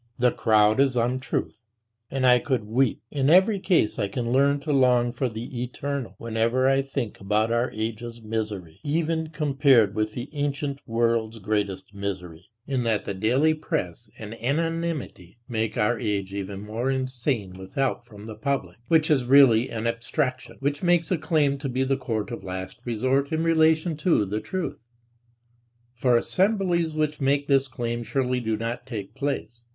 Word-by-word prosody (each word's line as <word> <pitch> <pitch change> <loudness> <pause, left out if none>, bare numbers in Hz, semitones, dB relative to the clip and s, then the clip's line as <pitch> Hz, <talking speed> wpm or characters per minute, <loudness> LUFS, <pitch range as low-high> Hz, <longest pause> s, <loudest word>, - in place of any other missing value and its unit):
The 125 0 +3
crowd 110 0 +3
is 135 -2 +3
untruth. 125 -2 -1 0.5
And 130 -1 -1
I 125 -1 +6
could 130 -2 -1
weep, 115 +1 0
in 140 -1 +1
every 190 +5 +5
case 170 - +1
I 100 - +1
can 115 +4 -3
learn 140 +2 +3
to 150 +1 -1
long 125 -3 +4
for 125 +1 -1
the 120 +2 -6
eternal, 135 +1 -4
whenever 115 +3 +1
I 135 0 +4
think 135 -5 -4
about 105 +3 +1
our 120 +2 +1
age's 115 +2 -5
misery, 105 -7 -4
even 160 +1 0
compared 140 -8 +3
with 110 0 -1
the 120 +3 -5
ancient 145 -1 -2
world's 115 -1 0
greatest 100 -2 -2
misery, 90 -4 -6 0.2
in 135 -3 -1
that 115 -3 0
the 100 - -3
daily 125 +11 +2
press 110 - -4
and 110 0 -7
anonymity 160 - -2
make 110 -3 -2
our 115 +2 +1
age 100 -4 -2
even 100 0 -5
more 115 +5 -2
insane 130 -6 -2
with 95 0 -11
help 135 -3 0
from 105 -3 -13
"the 110 - -7
public," 130 +3 -3
which 160 -1 +3
is 135 -5 +3
really 130 -3 +6
an 115 0 -4
abstraction, 130 +3 -2
which 145 +1 -1
makes 175 -1 +2
a 180 - +3
claim 150 -3 +1
to 135 -1 -3
be 130 +1 0
the 135 +1 +1
court 115 -5 -3
of 120 - -6
last 95 +4 -6
resort 130 +4 0
in 160 0 0
relation 160 0 +3
to 155 - +2
"the 105 +3 -2
truth"; 185 -2 -4 1.1
for 120 0 +3
assemblies 180 - +1
which 155 -1 -1
make 140 +1 +1
this 135 -1 +3
claim 120 -3 -3
surely 125 +1 -1
do 110 -2 -1
not 120 +3 -4
take 105 -6 -6
place. 135 -5 -3
125 Hz, 170 wpm, -25 LUFS, 110-140 Hz, 1.1 s, I